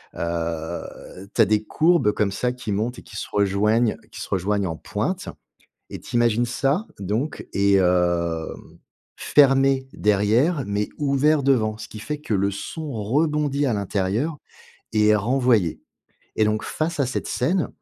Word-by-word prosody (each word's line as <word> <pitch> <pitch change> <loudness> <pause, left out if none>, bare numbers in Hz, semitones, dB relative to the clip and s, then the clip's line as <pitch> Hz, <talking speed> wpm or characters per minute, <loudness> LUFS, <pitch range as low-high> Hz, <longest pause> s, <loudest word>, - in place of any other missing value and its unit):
heu, 85 +2 -5
tu - - +3
as - - +7
des 105 +1 +1
courbes 160 -2 +3
comme 105 -1 0
ça 125 +5 -1
qui 125 -4 -6
montent 110 +5 -2
et - - -12
qui 110 - -14
se - - -4
rejoignent 105 +3 +2
qui - - -8
se - - -7
rejoignent 100 +1 0
en - - -5
pointe. - - -3 0.6
Et - - -7
tu - - -7
imagines 120 0 +3
ça, 140 - 0
donc 110 +10 -3
et 100 0 +3
heu, 85 -2 +1 0.7
fermé 135 -1 +3
derrière 110 - +2
mais 100 +1 -2
ouvert 145 +1 +2
devant, 110 -6 +2
ce 110 - -8
qui 110 - -10
fait 150 +7 -4
que 150 -7 -4
le 100 0 +1
son 150 - -6
rebondit 145 +5 0
à 120 - +1
l'intérieur 105 - -1 0.6
et 105 -1 +3
est 105 - +6
renvoyé 115 - +1 0.6
et 110 - +4
donc, 105 0 0
face 155 -1 -2
à - - +2
cette 125 - -3
scène, 170 +8 0
110 Hz, 160 wpm, -23 LUFS, 100-135 Hz, 0.7 s, as